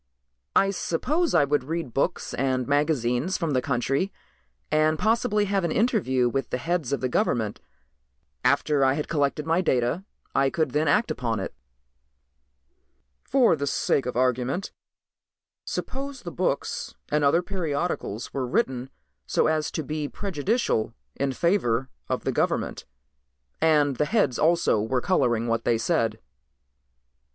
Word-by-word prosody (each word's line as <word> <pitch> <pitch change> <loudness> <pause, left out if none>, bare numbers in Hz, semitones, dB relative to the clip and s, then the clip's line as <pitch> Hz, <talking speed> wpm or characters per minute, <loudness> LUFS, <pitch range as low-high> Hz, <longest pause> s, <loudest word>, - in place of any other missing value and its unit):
"I 195 0 +4
suppose 290 - 0
I 160 - +6
would 145 -1 +1
read 160 -3 -4
books 155 +6 -1
and 130 -2 0
magazines 145 +1 +1
from 165 -4 -1
the 130 -2 +2
country 135 +9 0 0.6
and 155 +1 +3
possibly 220 0 +2
have 195 -1 0
an 170 - 0
interview 175 - +2
with 130 0 -2
the - - -1
heads 165 -1 -1
of 140 - -1
the 130 - +1
government. 110 -4 0 0.8
After 140 +2 +3
I 130 0 +4
had 150 - -3
collected 145 -1 0
my 165 +3 +2
data 130 +2 +1 0.3
I 135 0 +3
could 155 -2 0
then 150 +4 +1
act 210 +11 +3
upon 115 -3 -2
it." 95 - -5 1.7
"For 255 -9 +4
the 140 -1 -3
sake 135 -1 +1
of 125 - -3
argument 130 - 0 0.9
suppose 275 0 -5
the 175 - -5
books 170 -6 -2
and 150 0 +1
other 155 +5 +4
periodicals 165 - -3
were 130 -2 -2
written 130 +1 0 0.4
so - - +2
as 155 -1 +1
to 160 - -3
be 150 0 -3
prejudicial 190 - -1 0.2
in 140 0 0
favor 130 - +1 0.2
of - - -1
the - - 0
government, - - -1 0.8
and 150 -4 +3
the 150 - +2
heads 150 - +1
also 165 -9 +3
were 125 +4 0
coloring 120 -8 +1
what 115 0 0
they 120 -1 +2
said." 115 -2 0
145 Hz, 145 wpm, -26 LUFS, 125-175 Hz, 1.7 s, I